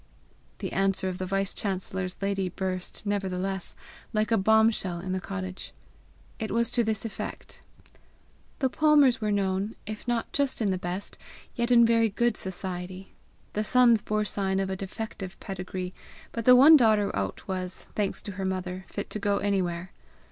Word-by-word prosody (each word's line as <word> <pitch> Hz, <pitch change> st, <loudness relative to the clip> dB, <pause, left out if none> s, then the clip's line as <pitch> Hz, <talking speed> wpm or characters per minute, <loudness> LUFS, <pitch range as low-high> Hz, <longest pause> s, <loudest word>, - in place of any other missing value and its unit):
The -, -, -4 dB
answer 195 Hz, -1 st, +1 dB
of 185 Hz, -, -5 dB
the 185 Hz, -, -3 dB
vice 195 Hz, 0 st, 0 dB
chancellor's 190 Hz, -1 st, -3 dB
lady 195 Hz, -2 st, 0 dB
burst, 185 Hz, +2 st, -4 dB
nevertheless, 190 Hz, -2 st, -2 dB, 0.4 s
like 215 Hz, +1 st, +1 dB
a -, -, +5 dB
bombshell 220 Hz, -3 st, +3 dB
in 185 Hz, +2 st, -5 dB
the 185 Hz, 0 st, -1 dB
cottage. 185 Hz, -1 st, -6 dB, 0.7 s
It 220 Hz, -, -3 dB
was 235 Hz, +2 st, +1 dB
to 240 Hz, -, +2 dB
this 220 Hz, 0 st, -1 dB
effect: 225 Hz, -, -6 dB, 1.0 s
The 265 Hz, -, +1 dB
Palmers 295 Hz, -6 st, +4 dB
were 210 Hz, -1 st, 0 dB
known, 195 Hz, +1 st, 0 dB
if 215 Hz, +2 st, -7 dB
not 240 Hz, -1 st, -1 dB
just 280 Hz, -2 st, +1 dB
in 210 Hz, -4 st, +1 dB
the 185 Hz, -, -1 dB
best, 180 Hz, +3 st, -5 dB, 0.3 s
yet 235 Hz, 0 st, -1 dB
in 235 Hz, -1 st, +7 dB
very 230 Hz, -1 st, +4 dB
good 235 Hz, +2 st, +1 dB
society; 185 Hz, 0 st, -4 dB, 0.4 s
the 210 Hz, -, 0 dB
sons 235 Hz, -1 st, +5 dB
bore 215 Hz, 0 st, 0 dB
sign 195 Hz, -1 st, 0 dB
of 190 Hz, 0 st, -1 dB
a -, -, -1 dB
defective 195 Hz, 0 st, -6 dB
pedigree, 185 Hz, -1 st, -5 dB, 0.4 s
but 230 Hz, -1 st, -4 dB
the 250 Hz, -, +9 dB
one 285 Hz, +6 st, +9 dB
daughter 220 Hz, -6 st, +4 dB
out 95 Hz, -1 st, -3 dB
was, 185 Hz, -1 st, -4 dB
thanks 205 Hz, -2 st, -1 dB
to 205 Hz, -, -5 dB
her 195 Hz, 0 st, -5 dB
mother, 185 Hz, 0 st, -3 dB
fit 205 Hz, -, -5 dB
to 215 Hz, -, -3 dB
go 200 Hz, 0 st, +1 dB
anywhere. 185 Hz, -3 st, -1 dB
195 Hz, 170 wpm, -27 LUFS, 185-220 Hz, 1.0 s, the